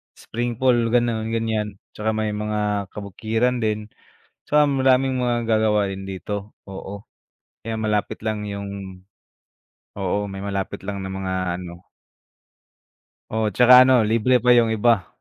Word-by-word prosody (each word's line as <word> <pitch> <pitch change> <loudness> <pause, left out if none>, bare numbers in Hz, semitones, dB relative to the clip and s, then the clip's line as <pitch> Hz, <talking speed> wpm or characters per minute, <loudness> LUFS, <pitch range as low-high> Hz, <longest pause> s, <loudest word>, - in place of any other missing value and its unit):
spring 120 0 -4
pool, 130 -1 +4 0.2
gano'n, 115 -2 +1
ganyan. 110 -3 -2 0.2
Tsaka 110 +1 -1
may 110 -1 -1
mga 105 -1 -2
kabukiran 110 +5 -1
din. 105 -1 -1 0.6
Tsaka 150 0 +4
maraming 135 -1 +2
mga 120 -2 0
magagawa 110 -2 +2
din 95 0 -6
dito, 100 +2 -5 0.2
oo. 100 +1 -8 0.6
Kaya 110 0 -4
malapit 105 -1 -1
lang 110 -1 -2
yung 100 -2 -7 1.0
oo, 100 +1 -1
may 95 0 -7
malapit 100 -1 -4
lang 100 -1 -4
na 95 - -5
mga 95 -1 -3 0.3
ano 85 0 -11 1.4
Oo, 110 -1 -1
tsaka 125 +4 +8
ano, 130 -1 +5
libre 115 +3 +3
pa 125 0 +5
yung 115 -2 +4
iba. 110 -3 +2
110 Hz, 135 wpm, -22 LUFS, 100-120 Hz, 1.4 s, tsaka